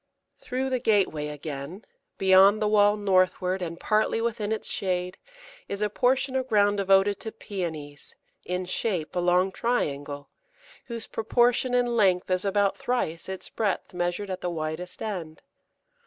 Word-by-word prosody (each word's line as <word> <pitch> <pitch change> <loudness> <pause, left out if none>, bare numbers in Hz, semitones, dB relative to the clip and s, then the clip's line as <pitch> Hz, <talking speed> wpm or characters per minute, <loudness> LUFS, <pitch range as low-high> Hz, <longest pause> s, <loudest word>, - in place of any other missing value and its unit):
Through 260 +1 -3
the 255 - +1
gateway 195 -10 +1
again, 150 +5 -7 0.3
beyond 195 +2 +6
the 215 - +1
wall 205 0 +4
northward 185 -1 +1
and 170 -1 -5
partly 215 +1 +1
within 220 -2 -2
its 220 - -2
shade, 180 -1 -2 0.5
is 200 +1 -2
a 210 - 0
portion 260 +3 +1
of 260 -1 0
ground 205 -3 +3
devoted 195 +1 +3
to 220 - -5
Pæonies, 160 -9 -6 0.3
in 180 +1 -3
shape 180 -3 -2
a - - +1
long 180 +2 +2
triangle, 145 - -2 0.6
whose 235 -3 -6
proportion 245 +2 +1
in 245 0 +3
length 185 -4 +2
is 185 0 +1
about 200 0 +1
thrice 180 -9 -2
its 190 -1 -5
breadth 205 -5 -2
measured 175 +3 -2
at 185 - -4
the 180 - -2
widest 160 +2 -5
end. 175 -8 -5
195 Hz, 150 wpm, -26 LUFS, 175-215 Hz, 0.6 s, beyond